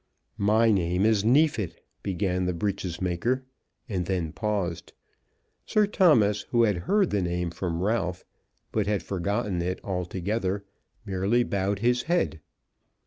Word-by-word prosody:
"My 110 +3 +4
name 90 0 +1
is 110 -2 +3
Neefit," 115 - +2 0.2
began 95 -1 -1
the 90 -1 -1
breeches 95 -2 -2
maker, 95 +9 0 0.4
and 90 -6 -2
then 90 -5 -1
paused. 100 -6 -3 0.7
Sir 215 -1 +3
Thomas, 145 - +4
who 120 -1 +3
had 105 -3 +3
heard 205 -3 +3
the 100 - +1
name 90 -1 -1
from 85 0 -3
Ralph, 95 -4 -1 0.5
but 105 -2 0
had 105 -4 0
forgotten 95 0 -1
it 90 +2 -2
altogether, 95 +2 -2 0.4
merely 100 +6 +1
bowed 100 -2 -1
his 125 0 +3
head. 170 - +1
100 Hz, 135 wpm, -27 LUFS, 90-110 Hz, 0.7 s, My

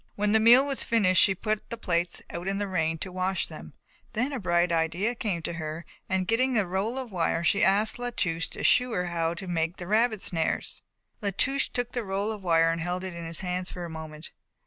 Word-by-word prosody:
When 205 0 +1
the 220 - +5
meal 240 +5 +7
was 275 -1 +1
finished 190 -5 +4
she 195 - +4
put 215 +2 -3
the 235 - -5
plates 175 -4 -1
out 175 +2 -5
in 195 0 0
the 205 0 -2
rain 165 -3 0
to 185 - -6
wash 185 +1 -1
them. - - -10 0.4
Then 245 +5 0
a 265 - -2
bright 175 -2 +2
idea 170 +7 +1
came 200 -8 -3
to - - -3
her 160 0 -5 0.2
and 190 -1 +1
getting 255 +5 +2
the 215 -4 +2
roll 195 +7 -2
of 255 -4 -5
wire 170 -2 0
she 200 +4 +3
asked 210 +4 +2
La 245 0 -2
Touche 165 -8 -1
to - - -6
shew 250 -1 +4
her 180 -3 0
how 170 -1 -1
to 180 - -7
make 165 0 -1
rabbit 215 +3 +1
snares. 165 -2 -2 0.4
La 205 - 0
Touche 275 +1 +2
took 245 -1 -3
the 245 - -3
roll 200 +2 -2
of 215 -2 -6
wire 165 -2 +3
and 165 0 -3
held 180 +2 -2
it 185 -1 -5
in 170 -1 -6
his 165 +1 -4
hands 180 0 -3
for 175 -1 -6
a 170 - -7
moment. 155 -1 -8
185 Hz, 235 wpm, -27 LUFS, 170-220 Hz, 0.4 s, meal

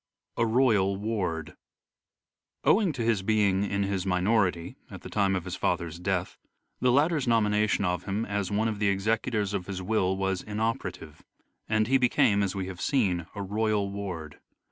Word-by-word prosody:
A 115 - +1
ROYAL 110 -5 +3
WARD 95 -7 -3 1.1
Owing 200 -4 +4
to 120 - -3
his 115 -4 +1
being 100 -2 +2
in 100 0 -1
his 100 -2 -1
minority 90 -2 +1
at - - -10
the - - -9
time 100 -2 +2
of 95 -2 -3
his 90 - -4
father's 85 0 -2
death, 90 0 -2 0.4
the 125 - +3
latter's 150 +1 +2
nomination 105 -3 +2
of 90 -1 -1
him 100 +3 -2
as 100 -2 -2
one 105 +2 +1
of 110 -2 -3
the 105 - +2
executors 105 +1 0
of 95 -3 -3
his 95 -1 -4
will 95 -2 +1
was 95 -1 -1
inoperative, 105 -7 -4 0.5
and 110 0 +2
he 135 +3 +3
became, 105 -4 +3
as 100 -1 -1
we 95 -1 -2
have 90 -1 -7
seen, 90 - +1
a 100 - -4
royal 105 0 0
ward. 90 -7 -6
100 Hz, 170 wpm, -27 LUFS, 95-110 Hz, 1.1 s, Owing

